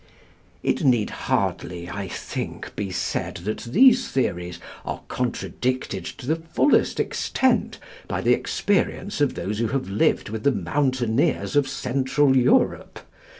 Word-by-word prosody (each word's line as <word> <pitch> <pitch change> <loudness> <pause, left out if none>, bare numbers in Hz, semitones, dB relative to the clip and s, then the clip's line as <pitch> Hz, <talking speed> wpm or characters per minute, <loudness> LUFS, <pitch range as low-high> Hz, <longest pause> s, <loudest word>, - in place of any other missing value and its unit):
It - - 0
need 120 -6 +3
hardly, 85 -1 -2
I 100 +2 -5
think, - - -6
be 100 -2 -3
said 90 - -2
that 110 +3 -2
these 250 - +5
theories 90 -9 -2 0.2
are - - -5
contradicted 125 +1 -2
to - - -8
the 160 +5 +1
fullest 165 - +2
extent 260 -1 +1 0.3
by - - -2
the - - +4
experience 200 -3 0
of 145 - +2
those 105 +2 -3
who 115 - +1
have 130 -3 -2
lived 100 - +1
with 110 0 -4
the 140 - +3
mountaineers 130 - 0
of 145 -2 +4
Central 135 +1 +1
Europe. 125 -1 +2
130 Hz, 135 wpm, -24 LUFS, 105-145 Hz, 0.3 s, these